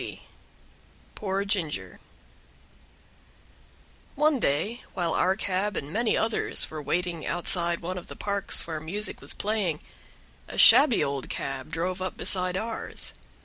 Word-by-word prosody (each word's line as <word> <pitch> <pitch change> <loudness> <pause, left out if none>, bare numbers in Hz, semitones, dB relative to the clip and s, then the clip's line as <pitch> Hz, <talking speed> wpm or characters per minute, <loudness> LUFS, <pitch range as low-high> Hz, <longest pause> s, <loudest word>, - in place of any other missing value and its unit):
40 - - -7 0.9
Poor 195 -1 -2
Ginger 185 -7 -3 2.2
One 300 -1 +3
day, 210 - 0
while 175 -3 0
our 185 +1 +2
cab 200 0 -1
and 145 +2 -5
many 225 +1 +1
others 225 0 +2
were 155 -1 -5
waiting 175 +2 -2
outside 170 0 +1
one 180 +2 -4
of 175 - -14
the - - -9
parks 200 -1 -1
where 160 -2 -4
music 195 +7 -1
was - - -2
playing, 200 -7 -1 0.7
a - - -8
shabby 275 -6 +7
old 140 -1 -3
cab 135 +1 -4
drove 180 +3 -3
up 185 - -4
beside 180 -1 +3
ours. 225 +2 -2
185 Hz, 135 wpm, -27 LUFS, 165-210 Hz, 2.2 s, shabby